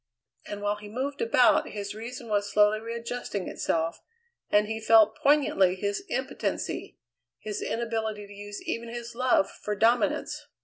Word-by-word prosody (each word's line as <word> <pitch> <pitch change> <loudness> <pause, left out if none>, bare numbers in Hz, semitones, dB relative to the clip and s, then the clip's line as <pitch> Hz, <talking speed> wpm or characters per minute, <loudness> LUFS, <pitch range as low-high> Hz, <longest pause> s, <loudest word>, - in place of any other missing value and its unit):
And 205 0 -6
while 205 0 0
he 210 0 -10
moved 270 +6 -3
about 230 +2 +4
his 200 -1 -5
reason 235 +3 -7
was 205 -1 0
slowly 210 0 +4
readjusting 230 -3 -4
itself, 165 +1 -1 0.5
and 210 0 +4
he 220 +1 -3
felt 220 -1 +6
poignantly 280 -11 +3
his 200 +1 -2
impotency, - - -3 0.4
his 210 -1 -5
inability 220 -3 -2
to 200 - -13
use 205 0 -8
even 230 0 -3
his 235 0 -6
love 250 -5 +2
for 210 - -4
dominance. 230 +4 +1
215 Hz, 145 wpm, -28 LUFS, 205-235 Hz, 0.5 s, felt